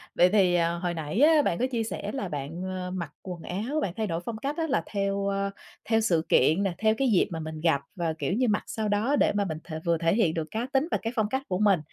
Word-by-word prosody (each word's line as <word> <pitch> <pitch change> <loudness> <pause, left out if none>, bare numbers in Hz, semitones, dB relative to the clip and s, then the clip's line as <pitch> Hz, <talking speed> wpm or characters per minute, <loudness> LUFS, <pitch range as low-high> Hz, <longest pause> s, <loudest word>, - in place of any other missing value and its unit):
vậy 180 +1 +6
thì, 185 -3 +4
à, 170 -1 +2
hồi 175 0 -2
nãy 160 +6 -3
á 310 0 +6
bạn 170 - 0
có 255 - +2
chia 230 -2 0
sẻ 205 -1 -4
là 205 -7 -3
bạn, 150 +4 -5
ờ, 185 -1 -4
mặc 170 -5 -4
quần 180 -3 -7
áo, 230 +12 -2
bạn 180 - -2
thay 220 -1 -1
đổi 165 -1 -2
phong 230 -2 -4
cách 280 +7 -3
á 325 -1 0
là 275 - +1
theo, 200 -1 -1
ơ, 200 0 0 0.4
theo 225 -1 +3
sự 170 -7 +1
kiện 160 +9 +4
nè, 190 -3 0
theo 220 +1 +3
cái 270 - +2
dịp 190 - +4
mà 165 - -4
mình 155 0 -6
gặp 160 -4 +2
và, 165 -3 -1
kiểu - - -1
như, 250 +4 +2
mặc 210 - +1
sao 220 -1 -2
đó 215 +8 +1
để - - +3
mà 200 -1 +1
mình 160 -3 -3
th 170 - -13
vừa 170 -1 +2
thể 165 +2 +2
hiện 195 -9 +2
được 160 -1 -3
cá 225 +3 -2
tính 270 +4 +2
và - - +2
cái 225 +2 -3
phong 215 -2 +1
cách 265 +2 -1
của 180 - -1
mình. 200 -5 +4
195 Hz, 285 wpm, -27 LUFS, 170-220 Hz, 0.4 s, vậy